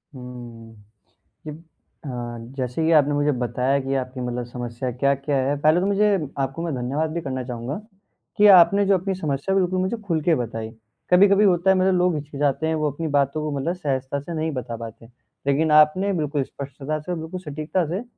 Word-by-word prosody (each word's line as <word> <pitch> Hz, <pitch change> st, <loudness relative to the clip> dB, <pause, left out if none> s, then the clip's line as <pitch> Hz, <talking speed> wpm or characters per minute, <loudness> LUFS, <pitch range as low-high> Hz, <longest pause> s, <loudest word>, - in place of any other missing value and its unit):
हुँ, 120 Hz, -3 st, -10 dB, 0.7 s
ये -, -, -4 dB
अ, 160 Hz, -1 st, -17 dB, 0.5 s
जैसे 130 Hz, +5 st, -2 dB
कि 165 Hz, -, +3 dB
आपने 145 Hz, -2 st, +4 dB
मुझे 145 Hz, +1 st, +2 dB
बताया 125 Hz, +2 st, 0 dB
कि 135 Hz, +1 st, -3 dB
आपकी 130 Hz, 0 st, -3 dB
मतलब 125 Hz, 0 st, -3 dB
समस्या 120 Hz, +1 st, -5 dB
क्या-क्या 140 Hz, +3 st, 0 dB
है। 145 Hz, -, +1 dB
पहले 155 Hz, +3 st, +4 dB
तो -, -, 0 dB
मुझे 205 Hz, +1 st, +3 dB, 0.3 s
आपको 135 Hz, +4 st, -2 dB
मैं 165 Hz, -3 st, -2 dB
धन्यवाद 135 Hz, +6 st, -1 dB
भी 170 Hz, -, -2 dB
करना 130 Hz, -3 st, -4 dB
चाहूँगा 125 Hz, +2 st, -5 dB, 0.6 s
कि 210 Hz, -, +6 dB
आपने 190 Hz, +4 st, +5 dB
जो 195 Hz, -1 st, +4 dB
अपनी 190 Hz, +2 st, -2 dB
समस्या 155 Hz, +2 st, -2 dB
बिल्कुल 185 Hz, -1 st, +1 dB
मुझे 190 Hz, +5 st, -1 dB
खुल 165 Hz, -4 st, 0 dB
के 165 Hz, -1 st, +3 dB
बताई, 115 Hz, -3 st, -4 dB, 0.4 s
कभी-कभी 200 Hz, +3 st, +6 dB
होता 180 Hz, -1 st, +3 dB
है 190 Hz, -, +6 dB
मतलब 185 Hz, 0 st, +3 dB
लोग 180 Hz, -1 st, +2 dB
हिचकिचाते 145 Hz, +1 st, -1 dB
हैं 160 Hz, -, 0 dB
वो 155 Hz, -1 st, 0 dB
अपनी 160 Hz, +4 st, -4 dB
बातों 145 Hz, 0 st, +1 dB
को 155 Hz, -, -2 dB
मतलब 170 Hz, +6 st, -1 dB
सहजता 140 Hz, -4 st, -2 dB
से 145 Hz, +5 st, -7 dB
नहीं 160 Hz, 0 st, -2 dB
बता 125 Hz, -4 st, -5 dB
पाते, 115 Hz, 0 st, -9 dB, 0.4 s
लेकिन 150 Hz, +3 st, +2 dB
आपने 155 Hz, +6 st, +5 dB
बिल्कुल 150 Hz, -5 st, -1 dB
स्पष्टता 140 Hz, +3 st, -6 dB
से 180 Hz, +4 st, -7 dB
और 175 Hz, -, -2 dB
बिल्कुल 160 Hz, +3 st, -6 dB
सटीकता 155 Hz, +2 st, -2 dB
से 185 Hz, +7 st, -3 dB
150 Hz, 195 wpm, -23 LUFS, 130-170 Hz, 0.7 s, कि